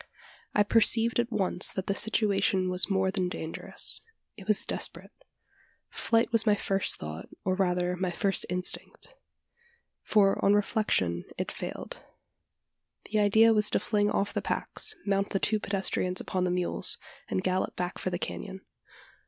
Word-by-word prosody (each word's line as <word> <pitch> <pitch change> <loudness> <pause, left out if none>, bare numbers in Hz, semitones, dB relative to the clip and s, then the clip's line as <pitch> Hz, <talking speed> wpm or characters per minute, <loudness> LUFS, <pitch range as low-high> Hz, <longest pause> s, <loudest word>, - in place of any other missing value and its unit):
I 210 - +5
perceived 225 +2 +4
at 240 0 0
once 190 -3 +1
that 190 - -4
the 200 - 0
situation 195 -3 +2
was 180 +2 0
more 190 -1 +1
than 185 -2 -1
dangerous: 160 -2 0 0.3
it 195 -3 -12
was 215 -2 +2
desperate. - - -1 0.8
Flight 230 0 +1
was 230 -1 +4
my 210 - +5
first 195 -1 0
thought, 80 +1 -7 0.2
or 185 - +1
rather 180 -1 0
my 185 0 -2
first 195 +2 0
instinct: 180 - -3 0.9
for, 200 -2 +2
on 200 +1 +5
reflection, 195 - 0
it - - -3
failed. - - -7 1.1
The 215 - +2
idea 220 +2 +5
was 210 -1 +3
to - - +1
fling 205 -1 +1
off 200 - -1
the - - -1
packs, 435 - -1
mount 200 0 0
the 195 - -1
two 215 +2 +1
pedestrians 190 -2 -1
upon 185 -1 -2
the - - 0
mules, 180 - -1 0.3
and 95 - -1
gallop 185 +1 -1
back 180 0 -4
for - - -2
the 175 - -2
canon. 190 +1 -6
195 Hz, 155 wpm, -28 LUFS, 180-210 Hz, 1.1 s, I